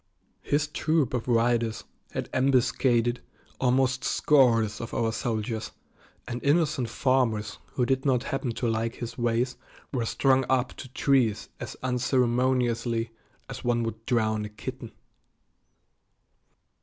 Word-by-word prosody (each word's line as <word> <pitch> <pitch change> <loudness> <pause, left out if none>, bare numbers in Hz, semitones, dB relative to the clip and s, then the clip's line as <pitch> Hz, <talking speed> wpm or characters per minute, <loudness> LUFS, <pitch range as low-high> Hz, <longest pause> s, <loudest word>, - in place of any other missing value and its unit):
His 145 +1 +1
troop 150 -2 0
of 125 -2 -2
riders 115 -1 +1 0.3
had - - -4
ambuscaded 125 -2 +2 0.4
almost 130 0 +2
scores 115 -7 +3
of 115 - -6
our 115 -1 +1
soldiers, 110 -1 -2 0.6
and 120 0 -5
innocent 145 -4 +2
farmers 115 -5 0
who 125 - +1
did 130 +1 0
not 130 -4 +2
happen 135 -2 -2
to 120 - -2
like 115 +1 -1
his 120 -1 -6
ways 120 +1 0 0.4
were 120 -4 -1
strung 135 +2 +3
up 130 -1 +1
to - - -8
trees 130 -4 +1
as - - -7
unceremoniously 125 -2 +1 0.4
as - - -8
one 120 -1 +1
would 115 0 -5
drown 110 -3 +1
a - - -6
kitten. 120 +2 -7
120 Hz, 125 wpm, -27 LUFS, 115-130 Hz, 0.6 s, scores